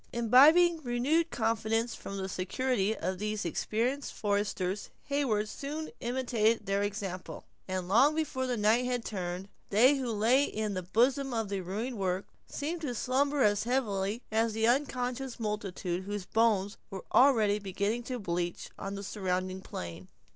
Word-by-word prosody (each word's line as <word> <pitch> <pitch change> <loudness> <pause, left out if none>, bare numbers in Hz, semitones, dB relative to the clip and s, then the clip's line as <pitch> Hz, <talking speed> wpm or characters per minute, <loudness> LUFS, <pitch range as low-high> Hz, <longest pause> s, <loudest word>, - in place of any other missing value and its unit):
Imbibing 305 +9 +6
renewed 280 +6 +1
confidence 225 0 0
from 200 - -7
the 190 -1 -3
security 205 +3 -1
of 185 +2 -3
these 210 -1 -2
experienced 240 - -1
foresters, 200 -2 -1
Heyward 260 -8 0
soon 295 +7 -5
imitated 235 -2 +1
their 195 +1 0
example; 200 -3 -4 0.2
and 185 -1 -3
long 265 +10 +5
before 275 -5 -1
the 245 -1 -1
night 220 +4 +3
had 245 -2 -2
turned, 180 -1 -4 0.2
they 250 +8 +5
who 255 -3 -2
lay 230 +6 +3
in 215 -4 -3
the 185 - -2
bosom 245 +8 +1
of 225 -3 -1
the 200 -1 -2
ruined 215 +6 -4
work, 185 0 -1 0.2
seemed 325 +4 -4
to 265 -6 -3
slumber 275 +4 +1
as 205 0 +2
heavily 220 -3 -1
as 225 0 +1
the 220 +1 +1
unconscious 255 0 0
multitude 195 -4 -3
whose 205 -1 -4
bones 205 -1 +2
were 195 -3 -7
already 220 -6 +5
beginning 200 +4 -2
to 250 +1 -4
bleach 175 -4 -3
on 195 0 -4
the 200 - -6
surrounding 185 -2 -2
plain. 90 - -7
220 Hz, 155 wpm, -30 LUFS, 195-255 Hz, 0.2 s, Imbibing